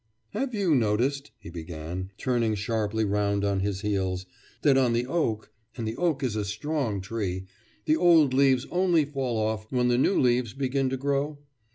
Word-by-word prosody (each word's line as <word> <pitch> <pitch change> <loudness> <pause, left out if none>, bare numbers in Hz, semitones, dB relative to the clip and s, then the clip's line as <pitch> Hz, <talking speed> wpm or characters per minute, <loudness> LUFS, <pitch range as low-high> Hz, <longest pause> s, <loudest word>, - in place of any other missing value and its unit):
'Have 250 +3 -2
you 195 -6 +2
noticed,' 130 +4 +1
he 100 -6 -11
began, 85 +2 -6
turning 115 -4 0
sharply 110 +1 -1
round 100 0 0
on 100 -1 +1
his 100 0 -2
heels, 95 -3 -1 0.4
'that 140 -3 +5
on 130 -3 +3
the 120 +1 +1
oak 125 -8 -1 0.3
and 115 -2 -3
the 110 - -3
oak 160 -4 0
is 120 -5 -1
a 105 - -1
strong 105 +1 -2
tree 95 -3 -3 0.4
the 155 - +3
old 160 -5 +5
leaves 135 -1 +3
only 175 -4 +3
fall 135 -5 -2
off 110 0 -2
when 125 -1 +2
the 120 0 +3
new 195 - +3
leaves 120 -3 +2
begin 135 0 0
to 130 - -2
grow? 140 +2 -1
120 Hz, 180 wpm, -27 LUFS, 105-140 Hz, 0.4 s, that